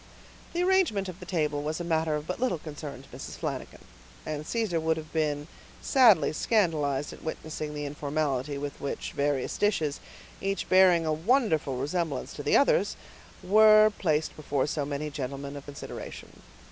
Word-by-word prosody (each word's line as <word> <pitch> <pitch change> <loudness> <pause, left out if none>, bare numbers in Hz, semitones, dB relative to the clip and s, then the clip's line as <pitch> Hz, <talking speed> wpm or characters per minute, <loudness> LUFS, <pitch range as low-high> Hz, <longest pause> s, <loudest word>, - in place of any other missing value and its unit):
The 350 +1 +1
arrangement 360 - +2
of 180 0 -9
the - - -10
table 150 -5 0
was 155 +3 -3
a - - -3
matter 160 -2 +1
of 150 0 -4
but 180 - -4
little 245 -8 +1
concern 150 -3 -8
to - - -18
Mrs. - - -8
Flanagan; - - -5 0.4
and 155 0 -4
Caesar 220 -8 0
would 160 0 +1
have 155 -1 -8
been 150 -2 0 0.3
sadly 220 - +5
scandalized 150 - +1
at - - -13
witnessing 155 -1 -5
the 145 0 -3
informality 145 -1 -2
with 145 0 -6
which 140 - -4
various 140 -2 -1
dishes, 160 -9 +1 0.4
each 195 0 -2
bearing 185 -3 +5
a 155 - +1
wonderful 160 - +1
resemblance 145 +1 -2
to - - -6
the - - +4
others, - - +3 0.5
were 215 +2 +7
placed 155 -4 0
before 145 -3 -1
so 145 -1 -2
many 145 +1 -3
gentlemen 140 0 -5
of 140 - -8
consideration. 145 -1 -9
155 Hz, 165 wpm, -28 LUFS, 145-185 Hz, 0.5 s, were